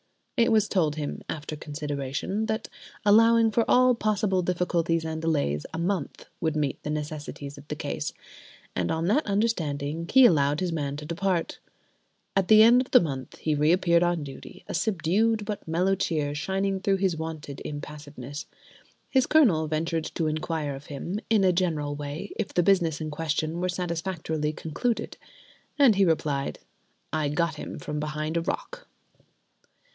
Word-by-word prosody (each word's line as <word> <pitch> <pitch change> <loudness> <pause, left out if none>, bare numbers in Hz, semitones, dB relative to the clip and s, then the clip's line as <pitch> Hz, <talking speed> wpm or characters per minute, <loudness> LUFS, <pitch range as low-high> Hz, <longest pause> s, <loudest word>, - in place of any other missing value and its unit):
It 235 -2 +3
was 215 -2 +4
told 160 -6 +1
him, 150 -2 -4
after 155 0 -4
consideration, 150 +6 -3
that, 220 0 -2 0.4
allowing 225 +2 +6
for 230 +2 +3
all 255 0 +6
possible 210 -4 +1
difficulties 170 -2 0
and 160 0 -3
delays, 145 - 0
a 160 - -5
month 175 -2 -2 0.2
would 160 -1 0
meet 145 -3 -1
the - - -5
necessities 150 -2 -5
of 140 - -15
the - - -4
case; - - -3 0.6
and 90 -2 0
on 160 +1 0
that 230 - +2
understanding 165 -7 -1
he 265 -1 +8
allowed 145 -8 +4
his 180 -2 -1
man 145 -3 -2
to 150 - -7
depart. 170 +1 -1 0.8
At 195 -2 +2
the 215 +2 +8
end 240 +3 +7
of 260 - -6
the 250 - +7
month 135 -6 -4
he 155 - -1
reappeared 170 +3 +3
on 175 -3 +1
duty, 135 -2 -10
a - - -5
subdued 210 +3 +1
but 205 -3 -5
mellow 180 +4 +2
cheer 155 -6 -1
shining 190 +5 -1
through 195 0 +1
his 190 -3 +1
wonted 160 -3 -6
impassiveness. 145 -2 -7 0.6
His 265 -2 +3
Colonel 205 - +4
ventured 160 +1 -1
to 165 - 0
inquire 155 -1 -2
of 135 +1 -10
him, 170 +8 -4
in 220 -3 +4
a 185 -1 +4
general 160 -5 0
way, 145 +6 -6
if 215 -3 -2
the 175 - +4
business 170 -5 +2
in 155 -1 -3
question 155 +2 -2
were 185 - 0
satisfactorily 170 -3 -2
concluded. 165 +11 -2 0.6
And 275 -6 +6
he 195 -1 +3
replied: 150 -4 0 0.6
"I 155 -2 +1
got 165 +2 0
him - - -6
from 150 0 -4
behind 155 +1 -3
a 170 - +2
rock." - - -5
165 Hz, 165 wpm, -27 LUFS, 150-195 Hz, 0.8 s, he